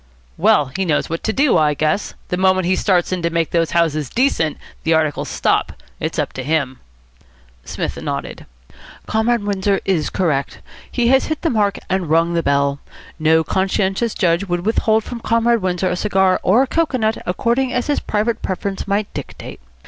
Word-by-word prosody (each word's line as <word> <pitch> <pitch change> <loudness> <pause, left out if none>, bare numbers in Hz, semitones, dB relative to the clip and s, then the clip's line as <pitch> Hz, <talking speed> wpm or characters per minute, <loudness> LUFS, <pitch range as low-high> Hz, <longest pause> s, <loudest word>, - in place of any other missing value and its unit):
"Well, 140 - +3
he 190 - 0
knows 160 -3 0
what 165 - -2
to 220 - +1
do, 265 - +3
I 150 -1 +2
guess. 155 +7 -1
The - - 0
moment 185 0 +2
he 185 +1 +2
starts 185 -3 +1
in 185 -1 -1
to 170 - 0
make 165 -1 -1
those 165 -1 +1
houses 155 -5 0
decent, 235 - +1 0.3
the 160 0 +3
articles 155 -2 0
stop. - - 0 0.3
It's - - -3
up - - -1
to 130 - -5
him." 140 -3 -1 0.8
Psmith - - -4
nodded. - - -5 0.6
"Comrade 220 +1 +1
Windsor 200 -1 0
is 175 -6 0
correct. 150 -7 -1 0.3
He 240 -2 +1
has 265 +1 +3
hit 315 -1 -3
the 330 - +1
mark 205 -3 +1
and 185 -4 -1
rung 165 +2 +2
the 170 - +1
bell. 140 -1 +1 0.4
No 160 +1 +3
conscientious 190 +5 0
judge 170 0 +1
would 175 -1 -2
withhold 220 0 +2
from 240 +1 -7
Comrade 230 0 +2
Windsor 185 0 0
a - - 0
cigar 190 -1 +2
or 220 +8 +4
a - - -3
cocoanut, 255 -9 0
according 235 +8 0
as 250 -1 -1
his 290 - 0
private 215 +2 -1
preference 195 +1 -3
might 200 +1 -1
dictate. - - -8
190 Hz, 180 wpm, -19 LUFS, 165-220 Hz, 0.8 s, or